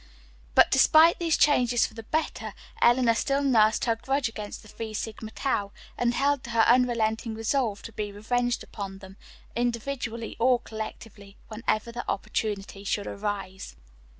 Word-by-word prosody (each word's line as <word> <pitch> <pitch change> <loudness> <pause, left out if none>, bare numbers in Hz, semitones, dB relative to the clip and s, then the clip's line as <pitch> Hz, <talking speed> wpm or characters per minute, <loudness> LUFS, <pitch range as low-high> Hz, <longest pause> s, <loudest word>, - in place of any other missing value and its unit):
But - - +6
despite 325 +1 +6
these 335 -2 +1
changes 245 -5 +4
for - - -8
the 225 - -8
better, 310 +8 -3 0.3
Eleanor 240 -1 +5
still 275 +4 0
nursed 220 -5 +3
her 230 -2 +2
grudge 270 +3 -1
against 215 -1 -7
the - - -15
Phi 220 +1 -7
Sigma 220 0 -5
Tau, 210 -4 -2 0.2
and 240 0 0
held 280 -1 +1
to - - -8
her 230 -1 +3
unrelenting 230 -2 +2
resolve 225 -1 -1
to 230 - -8
be 205 -1 -4
revenged 245 +4 -1
upon 195 -2 -7
them, 190 -1 -13 0.4
individually 235 -1 -3
or 250 +1 +4
collectively, 215 -2 -9
whenever 220 0 -2
the 240 +1 -5
opportunity 200 -1 -3
should 205 0 -1
arise. 200 - -5
230 Hz, 150 wpm, -27 LUFS, 215-245 Hz, 0.4 s, But